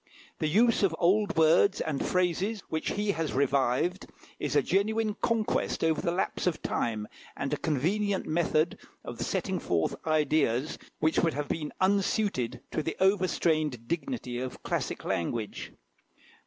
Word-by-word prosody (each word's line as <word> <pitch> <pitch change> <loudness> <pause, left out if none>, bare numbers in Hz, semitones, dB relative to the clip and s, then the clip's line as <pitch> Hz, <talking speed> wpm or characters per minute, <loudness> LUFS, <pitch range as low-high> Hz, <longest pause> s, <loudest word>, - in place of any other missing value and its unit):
The 155 - +1
use 225 +8 +3
of 190 -5 +2
old 205 +2 +2
words 165 +5 +5
and 145 -3 -1
phrases, 185 +4 0
which 160 0 -2
he 205 0 0
has 165 -5 -2
revived, 140 +6 +1 0.3
is - - -2
a - - +4
genuine 215 +2 +1
conquest 230 -2 0
over 160 -1 +2
the 170 - 0
lapse 185 +1 -1
of 170 - 0
time, 110 -2 -1 0.3
and - - -2
a - - +1
convenient 190 +7 0
method 160 0 +1 0.3
of - - -7
setting - - -1
forth 85 -2 0
ideas 150 -3 +1 0.2
which 155 +1 +2
would 165 -4 +1
have 145 0 -2
been 150 -2 -2
unsuited 195 - +1
to - - -1
the 160 +2 -4
over 190 0 +3
strained 155 -9 0
dignity 170 - -3
of 130 0 -6
classic - - -2
language. 105 +5 -3
165 Hz, 150 wpm, -29 LUFS, 145-195 Hz, 0.3 s, words